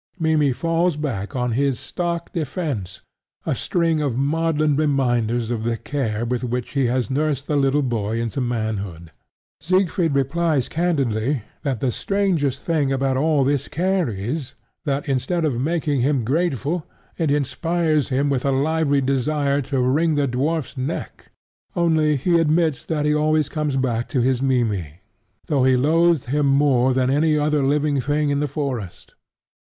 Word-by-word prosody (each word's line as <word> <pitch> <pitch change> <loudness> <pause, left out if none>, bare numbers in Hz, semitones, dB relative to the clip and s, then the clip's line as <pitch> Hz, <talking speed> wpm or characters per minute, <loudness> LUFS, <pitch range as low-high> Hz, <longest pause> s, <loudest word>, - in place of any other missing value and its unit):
Mimmy 160 -4 +2
falls 165 +4 0
back 135 -6 -4
on 125 -1 0
his 135 +1 0
stock 170 -1 -4
defence: 145 - -3 0.4
a - - 0
string 165 -3 0
of 135 -5 -1
maudlin 155 +1 +1
reminders 120 -6 +1
of 115 -2 -2
the 115 0 -1
care 115 -4 -2
with 125 +1 -2
which 125 0 -3
he 135 -3 +1
has 125 +2 -1
nursed 145 0 0
the 150 - -1
little 140 +1 +2
boy 115 -3 -1
into 115 +3 -2
manhood. 105 -8 -3 0.5
Siegfried 175 -1 +1
replies 140 0 +1
candidly 140 -7 0 0.2
that 135 -6 -2
the 130 - +1
strangest 170 - -1
thing 150 -5 +1
about 135 0 0
all 150 +1 +2
this 140 0 0
care 180 -1 0
is 120 +8 -4 0.3
that 140 0 -1
instead 155 +6 0
of 125 -5 -1
making 150 -3 0
him 135 -2 +1
grateful, 155 +3 0 0.4
it 160 -3 +1
inspires 155 +2 0
him 135 +2 +1
with 135 -3 0
a 140 - +1
lively 145 +1 +1
desire 140 +2 0
to 135 0 -2
wring 150 +6 +2
the 145 -1 +1
dwarf's 140 +4 -1
neck. 135 +5 -5 0.5
Only, 160 -3 +2
he 170 +5 +2
admits 160 -3 +1
that 150 -2 -1
he 150 - +3
always 155 -1 +2
comes 150 -3 -2
back 120 -3 0
to 130 - 0
his 130 0 +1
Mimmy, 110 - 0 0.5
though 140 -4 +1
he 130 0 +4
loathes 165 +2 +3
him 145 +3 +1
more 135 -2 +3
than 130 0 +2
any 155 +2 +2
living 150 -1 +1
thing 145 +2 0
in 140 - +1
the 150 - 0
forest. 130 - -5
140 Hz, 160 wpm, -22 LUFS, 125-155 Hz, 0.5 s, he